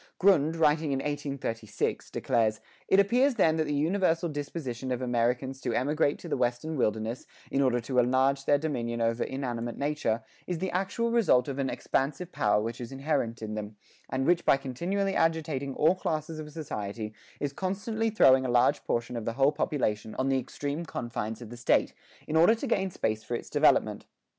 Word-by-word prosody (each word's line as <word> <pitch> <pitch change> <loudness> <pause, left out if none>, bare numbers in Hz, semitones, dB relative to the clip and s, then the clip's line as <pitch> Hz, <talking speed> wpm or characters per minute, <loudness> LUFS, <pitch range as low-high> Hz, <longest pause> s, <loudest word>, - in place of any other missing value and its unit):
Grund, 165 -5 +4
writing 155 -1 +2
in 135 - +1
1836, 135 -6 -3
declares: 110 -2 +1 0.3
"It 190 - +5
appears 245 +7 +3
then 160 -6 +3
that 160 - +1
the 150 -1 -1
universal 165 +2 +1
disposition 140 -4 -4
of 125 - -1
Americans 125 +2 0
to 120 - -2
emigrate 145 +3 +1
to - - -10
the - - -1
western 125 +5 -1
wilderness, 110 -1 -1 0.2
in 135 - +2
order 125 -3 +2
to 125 +2 0
enlarge 130 +2 +2
their 145 - +4
dominion 120 -6 -2
over 115 +1 +1
inanimate 120 -3 -4
nature, 140 -6 -1 0.2
is 180 - -2
the 185 +2 -2
actual 200 +5 -1
result 200 - +4
of 140 -1 -4
an 135 -1 0
expansive 150 +6 -2
power 105 0 +2
which 115 +2 -4
is 120 - -6
inherent 135 -5 -2
in 110 0 -4
them, 105 0 -5 0.3
and 135 0 -1
which 175 +1 +3
by - - +5
continually 175 +10 -2
agitating 155 -6 0
all 155 +4 +4
classes 155 -3 -3
of 150 -1 -7
society 110 -8 -5 0.3
is 140 -1 -2
constantly 210 +6 -1
throwing 135 -11 +5
a 130 - -2
large 120 +4 +3
portion 120 +1 -1
of 115 -2 -4
the 115 - -1
whole 135 +3 +4
population 110 -8 -1
on 130 +1 0
the 135 -1 +2
extreme 145 +5 -4
confines 120 -6 -4
of 115 - -11
the - - -7
State, 120 - +2 0.3
in 155 - -2
order 170 +8 +6
to 225 - -5
gain 190 -1 +1
space 110 -10 -2
for 120 - -3
its - - -7
development. - - +3
135 Hz, 185 wpm, -28 LUFS, 120-160 Hz, 0.3 s, order